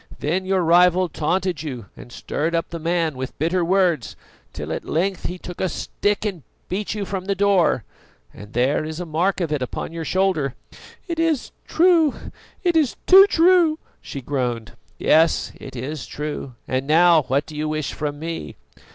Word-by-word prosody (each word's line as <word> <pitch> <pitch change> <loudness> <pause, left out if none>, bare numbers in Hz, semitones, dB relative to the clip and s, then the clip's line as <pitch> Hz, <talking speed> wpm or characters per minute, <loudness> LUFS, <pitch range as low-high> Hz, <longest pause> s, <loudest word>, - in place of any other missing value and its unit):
Then 180 +6 -1
your 190 -1 +2
rival 180 +2 +4
taunted 175 +1 -1
you 130 -8 -6
and 120 - -12
stirred 160 +6 -2
up 165 - -1
the 170 - -5
man 165 -2 0
with 130 0 -6
bitter 170 +4 +1
words, 175 -6 +1 0.4
till - - -5
at - - -4
length 185 +3 -1
he 180 - -5
took 180 0 -8
a 185 - +1
stick 205 +5 -2
and 190 -6 -3 0.3
beat 200 +3 -2
you 205 -2 -3
from 185 -1 -4
the 200 0 0
door, 195 - +3 0.5
and 105 +1 -12
there 130 +6 +1
is 155 +1 -5
a 180 - -4
mark 170 +5 0
of 170 -4 -2
it 150 -3 -1
upon 125 - -4
your 165 -1 -4
shoulder." 165 -6 0 0.5
"It 335 -2 -3
is 325 -5 0 0.2
true, 330 -4 +4 0.5
it 350 -2 +2
is 305 -6 +2
too 390 +2 +9
true!" 340 -3 +4 0.2
she 140 - -7
groaned. 125 -4 -2 0.3
"Yes, 160 0 +3
it - - -10
is 135 +3 -5
true. 150 -4 -5
And 130 +1 -2
now, 165 +1 +6
what 140 +3 +1
do 155 - -11
you 155 +1 -2
wish 155 -2 -2
from 145 -1 -4
me?" 160 - -6
170 Hz, 180 wpm, -22 LUFS, 150-195 Hz, 0.5 s, too